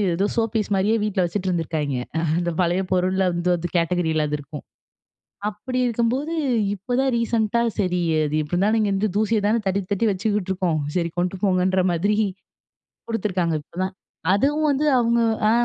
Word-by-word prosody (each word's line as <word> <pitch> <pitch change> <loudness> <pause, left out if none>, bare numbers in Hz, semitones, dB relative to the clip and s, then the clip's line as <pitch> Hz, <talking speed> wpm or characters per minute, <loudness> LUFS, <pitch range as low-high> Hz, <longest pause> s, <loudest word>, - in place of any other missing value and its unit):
ஏதோ 200 +3 +1
so 230 - +2
piece 215 -2 -1
மாரியே 205 +4 +2
வீட்ல 195 -3 0
வச்சுட்டு 185 +2 -2
இருந்துருக்காய்ங்க. 155 -6 -1 0.4
அந்த 175 -1 -1
பழைய 175 +2 +1
பொருள் 185 +1 +1
வந்து 175 +1 0
அது 175 +1 -3
கேட்டகரியில 165 -2 +1
அது 150 0 -1
இருக்கும். 145 +1 -9 0.9
அப்டி 255 +5 -4
இருக்கும்போது 245 +7 0 0.4
இப்போதான் 250 +7 -1
ரீசென்ட்டா 230 0 +1 0.2
"சரி, 180 -3 +1 0.2
அது 150 0 -3
இப்படி 150 - -10
இருந்தாலும் 210 +4 +2
இங்கே 205 -2 +1
வந்து 210 +2 +1
தூசிய 220 +1 +2
தானே 225 +2 +3
தட்டி, 195 +1 +1
தட்டி 200 +3 +1
வச்சுக்கிட்டு 200 0 -1
இருக்கோம். 180 -4 0 0.2
சரி, 170 -2 0
கொண்டு 180 +2 0
போங்கன்ற" 185 -1 +2
மாதிரி 200 +5 +1 0.9
கொடுத்துருக்காங்க. 185 -7 0
இப்போதான் 185 +5 -4 0.4
அதுவும் 295 +9 +2
வந்து 285 +2 +1
அவங்க 235 0 +2 0.3
ஆ - - +5
190 Hz, 155 wpm, -23 LUFS, 175-220 Hz, 0.9 s, ஆ